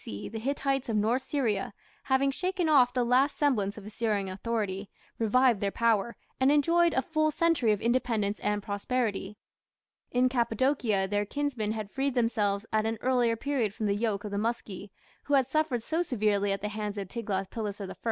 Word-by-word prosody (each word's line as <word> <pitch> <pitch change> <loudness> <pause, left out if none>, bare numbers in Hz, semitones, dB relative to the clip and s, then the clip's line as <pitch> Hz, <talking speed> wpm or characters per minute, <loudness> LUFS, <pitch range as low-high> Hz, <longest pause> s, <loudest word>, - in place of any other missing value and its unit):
C. 100 - -6
the 225 - -6
Hittites 270 +1 -1
of 225 - 0
North 225 +5 +2
Syria, 235 -8 -1 0.3
having 275 +1 +2
shaken 365 +3 -1
off 265 -5 +5
the 250 -1 +1
last 255 +4 +2
semblance 215 -9 +1
of 210 - -9
Assyrian 210 -2 -1
authority, 200 -1 -3 0.3
revived 235 0 +3
their 200 - +1
power, 230 +1 +1 0.2
and 265 +1 +4
enjoyed 335 +3 +3
a 265 - +2
full 310 +2 +1
century 305 -7 +2
of 210 - +1
independence 225 -4 0
and 210 -1 -1
prosperity. 205 -1 -2 0.7
In 250 +1 +3
Cappadocia 235 -4 +1
their 205 +1 0
kinsmen 255 -4 -2
had 215 -2 -5
freed 270 -1 -1
themselves 215 -4 +1
at 215 0 +2
an 225 0 -2
earlier 245 -2 +2
period 235 -4 -1
from 215 - -3
the 200 - +2
yoke 205 -1 -1
of 210 - -6
the 200 - -1
Muski, 210 -3 -3 0.4
who 290 - +2
had 265 -2 +4
suffered 270 -4 0
so 325 +6 0
severely 210 - +1
at 195 0 -2
the 210 - -2
hands 210 -1 -4
of 200 -2 -4
Tiglath 195 -3 -3
pileser 205 -3 -4
I. - - -7
230 Hz, 185 wpm, -29 LUFS, 205-265 Hz, 0.7 s, off